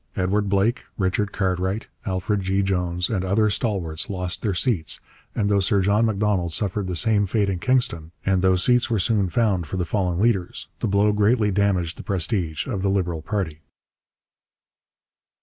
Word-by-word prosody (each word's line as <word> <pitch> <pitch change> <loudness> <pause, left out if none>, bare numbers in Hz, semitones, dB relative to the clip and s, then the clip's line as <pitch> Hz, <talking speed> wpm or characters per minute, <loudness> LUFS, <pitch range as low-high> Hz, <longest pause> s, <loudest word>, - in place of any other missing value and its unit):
Edward 100 +2 0
Blake, 100 +5 +1
Richard 95 +1 0
Cartwright, 95 +1 -1 0.2
Alfred 95 +2 -1
G. 95 +1 0
Jones, 90 -2 0
and 95 -5 -1
other 105 +3 +2
stalwarts 90 -6 -2
lost 90 -2 -3
their 100 -5 -1
seats, 90 -6 +1 0.4
and 105 - +1
though 100 -1 +3
Sir 100 +1 +2
John 105 +4 +3
Macdonald 100 -5 0
suffered 100 0 -1
the 90 - -3
same 105 +1 +2
fate 100 +1 +1
in 90 - -3
Kingston, 115 -9 0
and 95 -1 +2
though 95 0 +4
seats 125 +7 +3
were 115 - +1
soon 100 -1 +1
found 95 -3 +1
for 95 - -4
the 90 - -1
fallen 90 -1 -1
leaders, 100 -5 0
the - - -1
blow 100 +1 +3
greatly 105 +1 +2
damaged 95 -4 0
the - - -8
prestige 90 -4 -1
of 100 -7 -3
the 100 - +1
Liberal 90 -4 -1
party. 80 -5 -3
95 Hz, 170 wpm, -23 LUFS, 90-105 Hz, 0.4 s, though